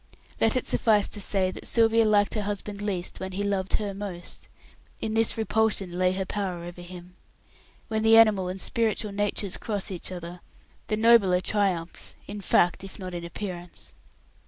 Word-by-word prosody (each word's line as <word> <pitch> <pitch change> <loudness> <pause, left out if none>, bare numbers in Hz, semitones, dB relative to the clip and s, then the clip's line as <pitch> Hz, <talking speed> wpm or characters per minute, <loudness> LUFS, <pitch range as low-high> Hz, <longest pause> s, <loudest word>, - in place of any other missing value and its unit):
Let 225 +1 +3
it 255 - 0
suffice 210 -3 +3
to 205 - -3
say 190 -1 +2
that - - -3
Sylvia 225 -1 +4
liked 205 -1 +3
her 215 - -1
husband 205 0 -4
least 190 -4 -2
when 190 0 -5
he 200 +2 -2
loved 195 -2 -1
her 205 -2 -2
most. 195 -3 -6 0.5
In 220 - -3
this 225 0 +2
repulsion 220 -4 +1
lay 185 0 +3
her 190 0 -2
power 185 -4 -3
over 175 +1 -8
him. 180 0 -10 0.7
When 220 -1 -1
the 225 +1 +6
animal 210 -5 +5
and 185 +1 -5
spiritual 220 -1 0
natures 205 -1 -1
cross 205 -2 -3
each 185 0 -5
other, 175 0 -7 0.5
the 215 - -1
nobler 220 -5 +5
triumphs 185 -4 -1
in 205 0 -7
fact 175 -1 +2
if 195 - -9
not 185 -1 -7
in 175 -1 -5
appearance. 175 0 -7
200 Hz, 175 wpm, -26 LUFS, 180-215 Hz, 0.7 s, the